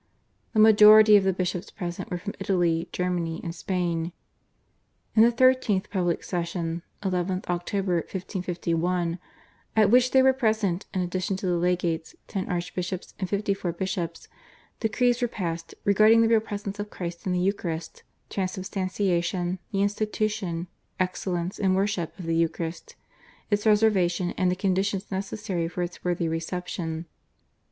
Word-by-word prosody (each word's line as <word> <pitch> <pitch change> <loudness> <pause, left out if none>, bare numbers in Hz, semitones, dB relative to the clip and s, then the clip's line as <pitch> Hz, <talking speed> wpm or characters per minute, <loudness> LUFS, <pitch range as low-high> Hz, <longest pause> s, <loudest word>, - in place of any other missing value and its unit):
The 215 - +2
majority 215 0 +8
of 200 - +6
the 190 - +4
bishops 185 0 -3
present 175 +2 -5
were 180 - -2
from 200 +3 -6
Italy, 175 -4 +1
Germany, 175 -2 -2
and 165 - -4
Spain. 170 -1 -2 1.0
In 220 - +6
the 235 +1 +7
13th 240 -5 +3
public 175 -4 0
session 170 -1 -3 0.2
(11th 185 -1 -1
Oct. 175 0 -3
1551), 175 -1 -1 0.6
at 215 -2 +5
which 250 +1 +5
there 265 0 +5
were 265 0 +6
present 220 -7 0
in 185 - -1
addition 185 +1 -2
to 190 - -5
the 180 - +1
legates, 170 -2 -1
ten 195 -3 -3
archbishops 180 +1 -3
and 185 -2 -2
fifty 200 0 0
four 185 -3 -3
bishops, 185 -1 -4 0.5
decrees 245 +2 +1
were 245 - +2
passed 165 -6 -4
regarding 215 +3 +6
the - - +4
Real 225 -1 +5
Presence 205 -1 -6
of 205 0 -4
Christ 175 -1 -6
in - - +1
the 180 - +1
Eucharist, 170 -4 -2 0.3
Transubstantiation, 185 -2 -1
the 195 -1 +1
institution, 205 -4 -1 0.3
excellence 180 -1 -2
and 190 -2 +2
worship 195 -4 -1
of 180 - -7
the 165 0 0
Eucharist, 165 0 -2 0.6
its 205 +1 +1
reservation 190 -5 +3
and 185 -1 +1
the 180 - +1
conditions 195 +1 -1
necessary 195 -2 -2
for 175 +1 -3
its 175 0 -7
worthy 175 -1 0
reception. 165 0 -3
185 Hz, 145 wpm, -26 LUFS, 175-205 Hz, 1.0 s, majority